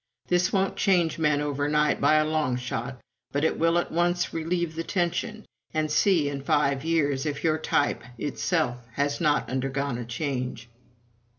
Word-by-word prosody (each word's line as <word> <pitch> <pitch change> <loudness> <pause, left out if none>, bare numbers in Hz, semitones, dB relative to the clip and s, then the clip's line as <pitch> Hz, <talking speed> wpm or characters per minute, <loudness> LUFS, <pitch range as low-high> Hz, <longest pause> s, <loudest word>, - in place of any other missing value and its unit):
This 180 0 +2
won't 195 -2 0
change 175 -5 +2
men 150 -2 +2
over 145 0 -1
night 150 0 +2
by 155 - +5
a 155 0 +4
long 155 -5 0
shot, 125 +1 -4 0.3
but 145 +1 -1
it 160 - +1
will 165 +1 +3
at 175 - -1
once 175 +1 +1
relieve 165 0 -1
the 165 - -3
tension 205 +5 -2 0.3
and 155 -1 0
see, 170 -3 +3
in 140 -1 -3
five 140 -2 +1
years, 155 -3 +1
if 145 -1 -3
your 155 -1 +2
type 145 - +1 0.2
itself 145 -1 -1 0.2
has 145 +4 -1
not 150 -3 +2
undergone 135 0 -2
a 120 - -5
change." 125 -2 -4
150 Hz, 170 wpm, -26 LUFS, 140-165 Hz, 0.3 s, by